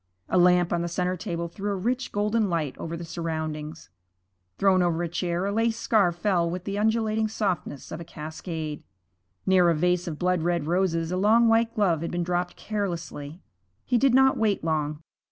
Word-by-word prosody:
A 185 - +3
lamp 180 -1 +4
on 170 - +1
the 170 - -2
centre 180 +1 -1
table 170 -2 -4
threw 200 +4 -5
a - - -1
rich, 245 +7 -2
golden 210 +1 +1
light 160 -6 -1
over 165 +1 -4
the 170 - -6
surroundings. 155 - -5 0.7
Thrown 190 -2 +4
over 175 -1 +1
a - - -1
chair 175 +1 -2
a 200 - 0
lace 225 +2 +1
scarf 205 -7 +2
fell 175 -2 +1
with 180 +1 -4
the 200 +1 -4
undulating 220 +1 +1
softness 190 -10 -3
of 155 - -5
a - - -6
cascade. 155 -1 -6 0.6
Near 185 -2 +5
a 165 - +3
vase 180 +2 +1
of 155 -3 -4
blood 180 +1 +1
red 170 -2 0
roses 165 -1 0
a 180 - -1
long 220 +4 +4
white 225 0 +3
glove 180 -7 +2
had 170 - -3
been 175 0 -2
dropped 175 0 -1
carelessly. 175 -6 -5 0.4
He 245 - +2
did 265 -1 +4
not 265 0 +5
wait 210 -5 +1
long. 155 -1 -1
180 Hz, 190 wpm, -26 LUFS, 165-205 Hz, 0.7 s, Near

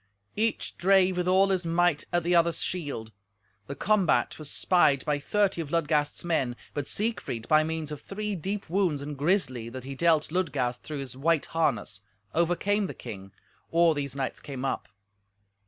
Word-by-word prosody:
Each 225 +2 -1
drave 190 0 +4
with 180 0 -1
all 190 +2 +4
his 185 -2 +1
might 170 -2 +2
at 175 -1 +1
the 175 +1 +2
other's 170 0 +3
shield. 140 -11 -4 0.6
The 140 - -5
combat 200 -5 +2
was 155 -2 -7
spied 150 -7 +3
by 150 -2 +1
thirty 195 +3 +1
of 155 - -6
Ludgast's 150 -2 0
men, 135 -8 0 0.2
but 145 -2 -3
Siegfried, 200 - -2
by 155 0 +5
means 160 -1 -3
of 150 - -6
three 210 +1 -4
deep 195 +3 -4
wounds 170 -5 0
and 145 0 -5
grisly 140 - 0
that 130 +1 -8
he 135 +1 -6
dealt 160 +1 +2
Ludgast 140 -9 -1
through 150 -3 -5
his 130 -2 -7
white 155 +3 +1
harness, 115 - -1 0.3
overcame 175 +5 +1
the - - -7
king 95 -1 -9 0.4
or 170 0 +4
these 140 -3 -4
knights 135 -1 -3
came 135 -2 -6
up. 135 - -2
160 Hz, 170 wpm, -28 LUFS, 140-180 Hz, 0.6 s, by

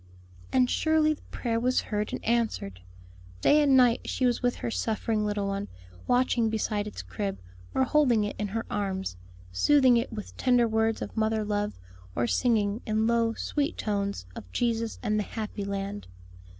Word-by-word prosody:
And 255 -1 +4
surely 315 +2 +2
the 300 - -13
prayer 230 -2 -1
was 250 +2 +2
heard 210 -1 -3
and - - -5
answered; 220 - -1 0.6
day 300 - +5
and 275 -2 +5
night 245 -2 +5
she 260 - 0
was 245 -1 +1
with 245 -1 +1
her 230 - -4
suffering 220 -1 -1
little 205 -1 -1
one, 200 0 -2 0.4
watching 245 -2 +2
beside 210 -1 -1
its 210 - -7
crib, 95 +2 -4 0.4
or 265 - +4
holding 260 -6 +3
it 205 - -3
in 210 - -1
her 225 +3 -3
arms, 190 - -2 0.4
soothing 260 - +5
it 235 +2 -1
with 215 -3 -7
tender 245 -2 +3
words 220 0 +1
of - - -8
mother 220 -1 +1
love, 205 0 -2 0.4
or 120 - +1
singing, 210 - +1
in 220 0 0
low 230 -1 +2
sweet 295 +2 -2
tones, 200 - -2
of 90 - -10
Jesus 230 - -1
and 215 -1 +1
the - - 0
happy 210 -1 -5
land. 200 +1 -4
220 Hz, 175 wpm, -28 LUFS, 205-245 Hz, 0.6 s, day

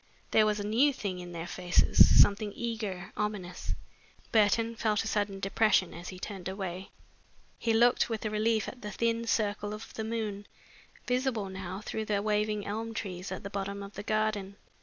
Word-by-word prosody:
There 215 -1 +5
was 210 0 +1
a 205 - -3
new 240 +8 +4
thing 195 -7 -4
in 175 0 -8
their 170 -1 -5
faces, 180 0 +5
something 205 +1 +5
eager, 215 -5 -4
ominous. 185 - -3 0.6
Burton 225 +1 +3
felt 215 -2 +1
a - - -4
sudden 205 -2 -1
depression 195 -1 +2
as 175 +2 -8
he 185 - -8
turned 190 -1 -6
away. 190 -1 -5 0.7
He 230 - +1
looked 240 +2 +4
with 225 -1 -3
relief 215 +1 +1
at 250 - -8
the 210 - -5
thin 230 +2 0
circle 210 -1 0
of 215 - -10
the 220 - -4
moon, 215 -3 -3 0.6
visible 250 -5 0
now 190 0 -6
through 220 +1 -4
the 210 -1 +1
waving 210 -1 0
elm 225 +2 -4
trees 185 -3 -5
at - - -5
the 200 - -6
bottom 200 0 -3
of 200 +1 -9
the 205 - -6
garden. 215 -2 -1
210 Hz, 180 wpm, -30 LUFS, 195-220 Hz, 0.7 s, There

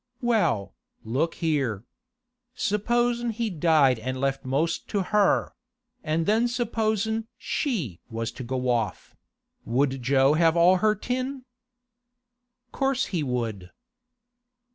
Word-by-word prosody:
'Well, 220 - +1 0.3
look 135 +9 -1
here. 135 - -1 0.7
Supposin' 240 +3 0
he 230 -1 -2
died 155 -7 +3
an' 130 +3 -3
left 135 0 -1
most 145 +6 -1
to 200 -3 -1
her; 205 +1 +2 0.5
an' 160 +1 0
then 220 +7 +2
supposin' 225 -2 -1
she 175 - -2
was 115 0 -3
to 130 - -8
go 125 +1 -3
off; 115 -3 -2 0.5
would 130 +2 0
Jo 135 +2 +4
have 165 +1 +3
all 180 +2 +6
her 215 +2 +2
tin?' 255 +4 -3 1.3
'Course 270 -1 0
he 170 - +1
would. 115 -9 -3
165 Hz, 115 wpm, -26 LUFS, -, 1.3 s, all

